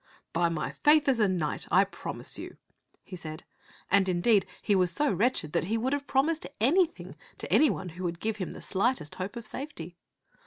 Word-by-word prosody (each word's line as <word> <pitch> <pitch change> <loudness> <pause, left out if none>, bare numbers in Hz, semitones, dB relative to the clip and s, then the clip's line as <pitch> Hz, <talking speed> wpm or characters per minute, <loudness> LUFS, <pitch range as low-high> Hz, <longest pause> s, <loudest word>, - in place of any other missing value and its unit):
"By 170 +1 +2
my 165 -2 -3
faith 295 -1 +4
as 260 -4 +3
a 210 - +4
knight 175 -5 -1
I 185 +3 +5
promise 200 - -4
you," - - -8 0.5
he 190 - -9
said; 160 -2 -8 0.5
and, 195 -1 +4
indeed, 190 +3 +3
he 210 - +1
was 185 -2 +3
so 295 +5 +1
wretched 220 - 0
that - - +1
he 220 +5 0
would 255 +5 0
have 285 0 -2
promised 305 +4 +1
anything 330 - +1 0.2
to - - -4
any 305 - +6
one 185 - -3
who 175 +3 -8
would 170 -1 -3
give 220 +2 -2
him 185 -4 -4
the - - -10
slightest 205 - 0
hope 190 +4 -5
of 235 -1 -7
safety. 180 - -6
200 Hz, 200 wpm, -29 LUFS, 175-265 Hz, 0.5 s, any